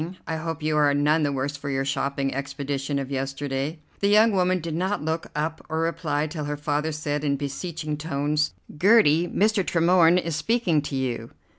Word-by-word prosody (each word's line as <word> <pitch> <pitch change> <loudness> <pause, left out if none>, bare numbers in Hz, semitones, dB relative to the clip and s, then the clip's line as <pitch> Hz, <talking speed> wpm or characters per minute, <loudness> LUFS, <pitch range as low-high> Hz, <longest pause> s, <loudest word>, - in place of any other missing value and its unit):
I 160 - -2
hope 160 -1 -4
you 155 0 +1
are 145 -1 +4
none 150 +2 +3
the 145 -2 +1
worse 140 +1 -2
for 140 0 -6
your 135 0 -1
shopping 140 0 -1
expedition 140 +1 -3
of 135 0 -4
yesterday." 135 +2 -3 0.2
The 200 - +2
young 215 +2 +5
woman 185 -1 +2
did 165 -1 -5
not 185 +2 -1
look 160 +1 -2
up 160 +1 -2
or 160 +1 -1
reply 165 -3 -1
till 155 -1 -5
her 145 0 -3
father 150 +1 -1
said 150 -1 -3
in 140 -1 +1
beseeching 150 +2 -4
tones: 150 0 -1 0.2
"Gertie, 175 -2 +5
Mr. 210 +2 +2
Tremorne 170 0 +4
is 170 -3 -1
speaking 175 -1 +1
to 145 -1 -5
you." 125 -3 -2
150 Hz, 185 wpm, -25 LUFS, 140-165 Hz, 0.2 s, young